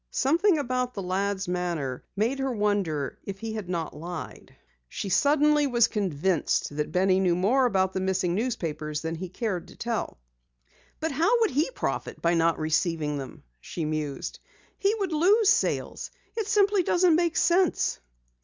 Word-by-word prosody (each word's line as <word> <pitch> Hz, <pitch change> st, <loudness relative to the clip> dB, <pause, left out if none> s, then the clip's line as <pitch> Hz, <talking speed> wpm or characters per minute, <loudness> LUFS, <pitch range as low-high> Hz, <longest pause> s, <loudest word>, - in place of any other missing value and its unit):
Something 330 Hz, +7 st, +2 dB
about 250 Hz, -3 st, -2 dB
the 200 Hz, -, -4 dB
lad's 195 Hz, +1 st, -1 dB
manner 170 Hz, -8 st, -2 dB
made 230 Hz, +7 st, 0 dB
her 270 Hz, 0 st, -1 dB
wonder 205 Hz, -, -1 dB
if 195 Hz, -1 st, -6 dB
he 225 Hz, +1 st, -5 dB
had 210 Hz, -5 st, -5 dB
not 165 Hz, -4 st, -3 dB
lied. 170 Hz, +2 st, -8 dB, 0.3 s
She 200 Hz, -, -4 dB
suddenly 295 Hz, -, +3 dB
was 240 Hz, -3 st, +4 dB
convinced 180 Hz, -6 st, 0 dB
that 150 Hz, 0 st, -2 dB
Benny 185 Hz, +1 st, +3 dB
knew 180 Hz, -2 st, +2 dB
more 245 Hz, +9 st, +3 dB
about 190 Hz, -3 st, +1 dB
the -, -, -1 dB
missing 190 Hz, -2 st, 0 dB
newspapers 165 Hz, -9 st, -2 dB
than 160 Hz, 0 st, -3 dB
he 175 Hz, +2 st, -6 dB
cared 190 Hz, -2 st, -3 dB
to -, -, -14 dB
tell. 235 Hz, -, -3 dB, 0.8 s
"But 320 Hz, -, -1 dB
how 345 Hz, -, +2 dB
would 445 Hz, -, +3 dB
he 295 Hz, -, +1 dB
profit -, -, -3 dB
by 170 Hz, +1 st, +2 dB
not 165 Hz, 0 st, +2 dB
receiving 155 Hz, -2 st, 0 dB
them?" 135 Hz, -, -9 dB, 0.2 s
she 160 Hz, -, -5 dB
mused. 150 Hz, -2 st, -4 dB, 0.4 s
"He 400 Hz, +2 st, +2 dB
would 395 Hz, -5 st, -2 dB
lose 390 Hz, +7 st, +4 dB
sales. -, -, 0 dB, 0.3 s
It 445 Hz, -3 st, -2 dB
simply 410 Hz, -2 st, +3 dB
doesn't 355 Hz, 0 st, +3 dB
make 340 Hz, -1 st, +1 dB
sense." 360 Hz, 0 st, +2 dB
200 Hz, 165 wpm, -27 LUFS, -, 0.8 s, was